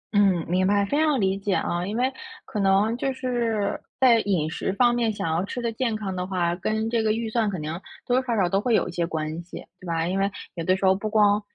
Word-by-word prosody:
嗯， 195 -5 +3
明 185 +2 +2
白， 200 0 +3
非 285 +9 0
常 300 -4 +2
理 195 -1 +1
解 200 0 -1
啊。 175 0 -1
因 210 +3 -3
为， 255 +2 +1 0.3
可 210 - -4
能 200 +3 +3
就 270 +2 -1
是， 235 -5 -1 0.2
在 245 -3 +6
饮 185 -8 0
食 190 - -2
方 240 +3 +4
面 235 -2 +1
想 205 - -4
要 165 +2 0
吃 205 +5 -5
得 235 -1 -1
健 230 0 -1
康 200 -3 -4
的 180 0 -3
话， 175 -2 0
跟 220 +5 -1
这 230 0 +1
个 215 -1 +2
预 225 +1 -2
算 225 -2 +1
肯 185 -4 -4
定 155 0 -4 0.3
多 245 - +1
多 - - -12
少 235 - +1
少 185 - +3
都 195 +3 +1
会 235 +1 +2
有 - - +2
一 - - -5
些 170 -1 -1
关 160 0 -3
系， 175 - -10
对 185 - -11
吧？ 165 -1 0
因 190 +2 -1
为 195 +1 +2 0.2
有 165 - -4
的 185 +3 +2
时 195 - -1
候 190 - +6
不 200 +3 -3
光 210 -1 +4
200 Hz, 285 characters per minute, -25 LUFS, 180-230 Hz, 0.3 s, 在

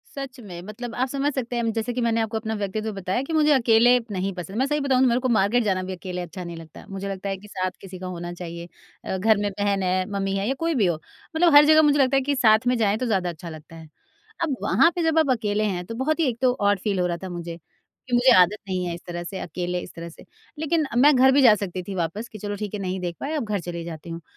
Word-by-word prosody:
सच 270 -2 -7
में 180 -6 -9
मतलब 220 +5 -7
आप 255 +2 0
समझ 280 +2 0
सकते 245 -2 -3
हैं 230 -1 0
जैसे 230 +2 -2
कि 250 - -2
मैंने 230 -1 +1
आपको 220 0 -2
अपना 220 0 -3
व्यक्तित्व 210 +2 -3
बताया 195 +5 -2
कि 320 +4 -5
मुझे 305 -1 +4
अकेले 240 -1 +5
नहीं 195 0 -2
पसंद। 180 +3 -7
मैं 260 - +2
सही 295 +1 0
बताऊँ 265 -2 +2
तो 260 - +5
मेरे 240 0 +2
को 255 - 0
मार्केट 230 +2 +3
जाना 190 -3 0
भी 190 0 -5
अकेले 180 0 -5
अच्छा 180 +1 -7
नहीं 170 -1 -7
लगता, 160 -1 -12
मुझे 195 0 -5
लगता 195 0 -4
है 195 - -2
कि 210 - -14
साथ 185 -2 -2
किसी 185 -2 -9
का 185 - -6
होना 175 -1 -5
चाहिए 170 -1 -7 0.4
अ, 190 - -2
घर 215 +2 +3
में 205 0 -1
बहन 200 -1 0
है, 185 0 +1
मम्मी 195 -1 -1
है 195 +1 -1
या 265 - +1
कोई 330 -1 0
भी 220 -6 +3
हो। 175 -2 +1 0.4
मतलब 330 -1 +4
हर 295 0 +9
जगह 310 0 +6
मुझे 290 -1 +3
लगता 270 0 +3
है - - +3
कि 285 +2 -1
साथ 225 -2 +4
में 250 - +3
जाएँ 210 -2 +2
तो 255 - -2
ज़्यादा 190 -6 0
अच्छा 170 0 -8
लगता 160 +1 -11
है। 160 -1 -11 0.6
अब 290 -5 0
वहाँ 335 - +4
पे 350 - -1
जब 320 0 +1
आप 315 -3 +2
अकेले 215 -3 0
हैं 180 -3 -2
तो 230 - -7
बहुत 300 +7 -1
ही 325 - +3
एक 235 -1 -5
तो 255 -1 +4
ऑड 205 -1 +3
फील 195 -1 -1
हो 180 - +2
रहा 170 -1 -2
था 190 - -5
मुझे 170 -1 -6 0.5
कि 250 - -6
मुझे 250 +2 +5
आदत 180 +4 +4
नहीं 185 -1 -2
है 175 - -3
इस 170 - -11
तरह 175 0 -5
से 190 +2 -6
अकेले 180 +1 -3
इस - - -10
तरह 170 0 -7
से। - - -15 0.3
लेकिन 315 0 +1
मैं 285 +3 +6
घर 265 +1 +6
भी 280 - +4
जा 240 -5 +8
सकती 185 -3 -5
थी 195 +1 -6
वापस 185 +7 -3
कि 215 - -9
चलो 205 0 -4
ठीक 210 0 -5
है 210 - -3
नहीं 185 -1 -3
देख 175 -1 -4
पाए 300 +3 -4
अब 290 -6 -2
घर 210 -2 -1
चली 170 -1 -6
जाती 170 0 -8
हूँ। 165 0 -6
205 Hz, 290 wpm, -24 LUFS, 180-250 Hz, 0.6 s, हर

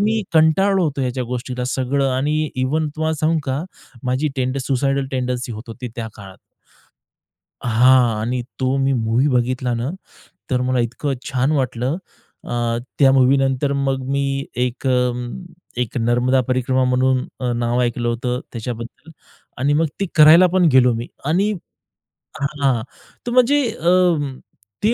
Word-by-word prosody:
मी 215 +1 +1
कंटाळलो 180 +4 +4
होतो 145 -3 -2
याच्या 125 0 -2
गोष्टीला 125 +1 -4
सगळं 135 +2 0
आणि 150 +3 0
इव्हन 150 +5 0
तुम्हाला 160 0 0
सांगू 160 +1 +2
का 135 +3 -2 0.4
माझी 130 +4 0
टेंडन 130 +1 -1
सुसायडल 135 0 0
टेंडन्सी 125 -1 -2
होत 110 +1 -7
होती 125 +2 -7
त्या 115 -2 -4
काळात. 95 -2 -11 1.3
हां. 120 -1 +4
आणि 120 +3 -2 0.2
तो 130 +1 +1
मी 135 0 +2
मूव्ही 115 +3 +1
बघितला 125 -1 0
ना, 120 +4 -2 0.6
तर 125 -1 +1
मला 130 0 0
इतकं 125 +4 -2 0.2
छान 130 +3 +1
वाटलं 130 0 -1 0.5
अ, 120 -1 -1 0.2
त्या 135 -2 +6
मूव्हीनंतर 135 +1 +3
मग 135 -1 0
मी 140 0 +1 0.3
एक 125 +2 -2
अ, - - +3 0.9
एक 120 - -3
नर्मदा 120 +3 +2
परिक्रमा 130 +1 +1
म्हणून 130 0 +2 0.2
अ, 125 -2 -1
नाव 120 +1 0
ऐकलं 120 0 -1
होतं 125 +1 -2
त्याच्याबद्दल 120 +6 -7 0.5
आणि 140 +3 +1
मग 160 +2 +2
ते 195 - +1
करायला 160 +4 +8
पण 185 -1 +3
गेलो 125 -2 +5
मी. 115 +2 -4 0.2
आणि 185 +8 +1 0.9
हां, 140 -4 0 0.5
तर 240 - -1
म्हणजे 255 +4 +4
अं, 170 -7 +1 0.5
ती 220 +3 +3
130 Hz, 145 wpm, -20 LUFS, 125-145 Hz, 1.3 s, करायला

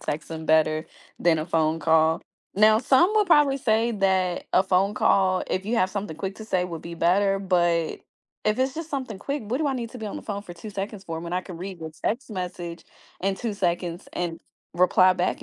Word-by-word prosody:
texting 160 +1 -5
better 155 0 +3 0.3
than 165 -2 +3
a 155 - -2
phone 160 -2 +1
call. 160 +1 +3 0.3
Now, 215 +2 +6
some 310 - +4
will 425 -1 +4
probably 295 -5 +4
say 225 -1 +2
that 190 -3 +1
a 185 - +6
phone 195 +2 +2
call, 185 -2 +3
if 190 +1 -2
you 235 +2 0
have 185 -3 +2
something 200 -6 -4
quick 195 +4 -4
to 220 - -8
say 185 -4 +1
would 170 -3 -6
be 170 0 -7
better, 195 +4 +2
but 175 -4 +1 0.4
if 215 +2 +1
it's 260 +1 +1
just 325 0 -5
something 260 -8 -4
quick, 280 +5 -3
what 235 +5 -2
do 310 - 0
I 275 - 0
need 235 -3 -4
to 250 - -9
be 220 - -5
on - - -5
the - - -7
phone 200 -2 -4
for 175 -4 -10
2 210 +5 -9
seconds 200 0 -5
for 165 0 -5
when 170 0 -6
I 180 - +1
can 180 -3 -9
read 185 0 -6
your 160 0 -6
text 240 +2 -1
message 180 -3 -5 0.4
in 195 0 +1
2 230 +1 -3
seconds 175 -2 -2
and 175 -2 -3 0.3
reply 185 +1 +5
back 185 +11 -1
190 Hz, 220 wpm, -25 LUFS, 170-220 Hz, 0.4 s, Now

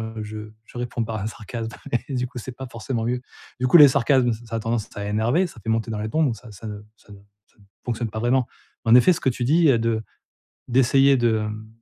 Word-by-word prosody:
heu, 110 0 -6
je 105 0 -8
je 120 - -16
réponds 120 -1 -2
par 110 0 -4
un 105 - -3
sarcasme 115 +1 -6 0.4
et 135 - -4
du 125 0 -1
coup 125 0 -9
c'est 125 +2 -7
pas 130 - -7
forcément 115 0 -3
mieux. 125 +1 -1 0.4
Du 130 - +1
coup, 175 - +7
les 150 - +11
sarcasmes, 125 -1 +2
ç 115 +2 -8
ça 115 - -3
a - - -2
tendance 115 -1 -2
à 100 - -4
énerver, 120 - +1
ça 120 -10 -13
fait - - -9
monter 115 0 0
dans 105 - -3
les 110 - -3
tons, 160 0 +2
donc 125 -5 +1
ça 115 +1 -13
ça 105 +3 -10
ne 105 -1 -6 0.2
ça 105 - -18
ne 100 - -12 0.3
ça - - -35
ne - - -21 0.2
fonctionne 120 -2 -3
pas 110 - -5
vraiment. 125 +2 +1 0.4
En 115 +1 +5
effet, 125 +9 +6
ce - - -4
que - - 0
tu 120 0 -3
dis, 160 +5 +4
heu, 120 - +3
de 115 -1 0 0.7
d'essayer 135 +2 +4
de, 115 -2 +2
hem 110 0 -5
115 Hz, 265 wpm, -23 LUFS, 110-125 Hz, 0.7 s, les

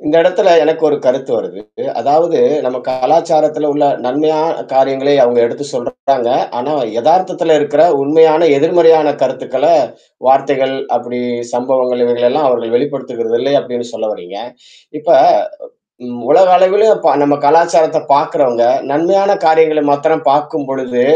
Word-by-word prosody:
இந்த 160 +2 +1
இடத்துல 185 +2 +2
எனக்கு 160 +1 -1
ஒரு 145 - 0
கருத்து 135 +1 -1
வருது. 100 - -7 0.4
அதாவது 160 +4 +1 0.3
நம்ம 125 0 -3
கலாச்சாரத்துல 150 +3 0
உள்ள 145 0 0 0.2
நன்மையான 155 +4 -1
காரியங்களை 135 +1 +1
அவுங்க 120 0 +2
எடுத்து 145 - -7
சொல்றாங்க. 135 - -3 0.3
ஆனா 145 +5 -4 0.3
எதார்த்தத்துல 175 +2 +1
இருக்கற 145 +1 +1 0.2
உண்மையான, 155 +2 +3 0.2
எதிர்மறையான 160 -1 +3
கருத்துக்கள - - -2 0.6
வார்த்தைகள், 135 0 +1 0.2
அப்டி 120 0 -6 0.3
சம்பவங்கள், 125 0 -1
இவைகள 120 0 +1
எல்லாம் 150 +2 0
அவர்கள் 120 -2 -2
வெளிப்படுத்துகிறது 125 -4 -4
இல்லை 140 +2 -1
அப்டின்னு 120 -1 -7
சொல்ல 110 -1 -5
வர்றீங்க. 95 -1 -11 0.6
இப்ப - - -1 0.9
ம் 120 0 -9
உலக 190 0 +5
அளவிலும் 205 +3 +2
ப - - +4 0.2
நம்ம 145 0 +1
கலாச்சாரத்த 165 0 +2
பார்க்கறவங்க 135 -5 0 0.3
நன்மையான 195 +7 +1 0.2
காரியங்கள 160 -1 +2
மாத்திரம் 160 +2 -1
பார்க்கும்பொழுது, 135 -4 -3
145 Hz, 125 wpm, -13 LUFS, 125-160 Hz, 0.9 s, உலக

